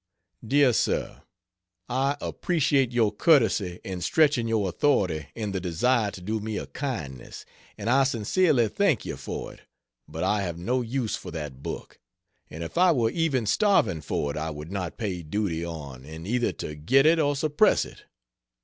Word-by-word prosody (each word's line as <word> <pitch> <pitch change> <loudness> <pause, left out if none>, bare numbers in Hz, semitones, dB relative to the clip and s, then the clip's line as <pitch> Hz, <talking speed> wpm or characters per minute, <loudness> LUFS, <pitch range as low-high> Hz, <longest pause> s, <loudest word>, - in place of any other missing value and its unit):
Dear 135 +2 +4
sir, - - -1 0.7
I 135 +3 0
appreciate 140 -7 +1
your 115 -4 +2
courtesy 105 - +3
in 95 -2 -5
stretching 140 - +3
your 110 -3 +1
authority 90 - +1
in 105 -3 -3
the 95 - -2
desire 105 +6 +1
to 95 - -10
do 110 +4 -2
me 110 0 -4
a - - -4
kindness, 80 - -6 0.3
and 105 0 -6
I 135 +3 +4
sincerely 125 - +2
thank 150 - +1
you - - -4
for - - -6
it. - - -18 0.5
But 80 +2 -5
I 105 -1 +1
have 85 -4 -3
no 125 +9 0
use 120 -1 -2
for - - -8
that 75 -6 -6
book; 80 +2 -7 0.5
and 80 +2 -7
if 85 - -4
I 180 -1 +6
were 115 -7 +2
even 150 -8 0
starving 105 - +2
for 70 0 -2
it 75 - -6
I 80 +1 -2
would 75 +2 -8
not 95 -4 -4
pay 95 -6 -3
duty 85 0 -2
on 70 -7 -7
in 80 +3 -9
either 120 +4 0
to 75 - -6
get 130 - +3
it 165 +1 +5
or 145 -2 +2
suppress 155 +8 +3
it. - - -14
110 Hz, 175 wpm, -26 LUFS, 85-135 Hz, 0.7 s, I